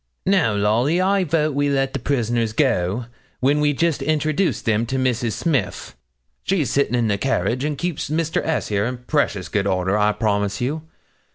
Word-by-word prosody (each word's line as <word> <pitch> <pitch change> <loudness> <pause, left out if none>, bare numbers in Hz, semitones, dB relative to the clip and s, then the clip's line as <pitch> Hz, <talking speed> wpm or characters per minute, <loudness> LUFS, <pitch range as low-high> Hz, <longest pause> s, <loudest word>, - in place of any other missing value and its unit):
Now, 185 - +2
Lolly, 115 - +2
I 195 +1 +2
vote 155 -2 0
we 145 +1 +1
let 135 -1 0
the 140 - -2
prisoners 120 -4 0
go, 115 -4 +1 0.3
when 140 +3 +2
we 150 0 +3
just 160 +1 0
introduce 155 +5 0
them 110 +1 0
to 130 - -2
Mrs. 125 -3 0
Smith; 130 - -2 0.5
she's 180 -8 0
sitting 140 -3 +1
in 120 -2 +1
the 100 -2 0
carriage, 125 0 0
and 150 -1 -2
keeps 175 -3 -3
Mr. 160 +1 0
S. 160 - -1
here 100 0 0
in 125 0 -4
precious 120 - -1
good 100 +2 -1
order, 95 0 +1
I 105 0 +3
promise 100 -3 -1
you. 145 +6 -2
130 Hz, 180 wpm, -21 LUFS, 110-150 Hz, 0.5 s, we